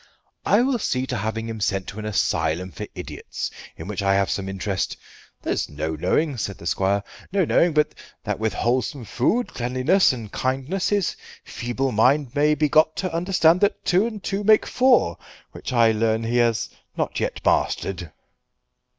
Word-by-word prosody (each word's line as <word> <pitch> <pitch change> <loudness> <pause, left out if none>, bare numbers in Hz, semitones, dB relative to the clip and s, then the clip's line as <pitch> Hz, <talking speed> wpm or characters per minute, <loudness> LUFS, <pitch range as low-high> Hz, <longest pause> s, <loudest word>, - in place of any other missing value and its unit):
I 215 +4 +5
will 255 -2 +1
see 130 -9 -1
to 130 - -3
having 110 +2 -3
him 115 -1 -5
sent 95 -1 0
to 105 - -8
an 105 - -6
asylum 90 -3 0
for - - -7
idiots - - -6 0.3
in 80 - -7
which 100 -2 -3
I 95 0 +3
have 100 0 +1
some 95 -1 -2
interest. 95 0 -2 0.5
There's - - -1
no 80 +2 -3
knowing," 130 - 0
said 100 -3 -3
the - - -12
squire, 100 +3 +1 0.3
"no 195 -2 +2
knowing 170 +2 +3
but 150 0 +2 0.3
that - - -3
with 110 0 0
wholesome 125 +1 -1
food, 205 - 0
cleanliness, 130 +11 +2
and 115 -5 -7
kindness 135 +9 -1
his 205 -3 0 0.3
feeble 125 +2 -3
mind 130 +4 +3
may 150 +1 +3
be 150 +1 +2
got 155 +2 +4
to 185 -3 -3
understand 175 0 +3
that 205 - +1
two 190 +5 +3
and 215 -4 -7
two 200 +1 -2
make 215 +1 +5
four, 250 - +3 0.3
which - - -7
I 115 -2 +5
learn 110 +1 +1
he 115 +2 0
has 115 -2 +2 0.3
not - - -1
yet - - -2
mastered." 90 -4 0
120 Hz, 175 wpm, -23 LUFS, 100-165 Hz, 0.5 s, I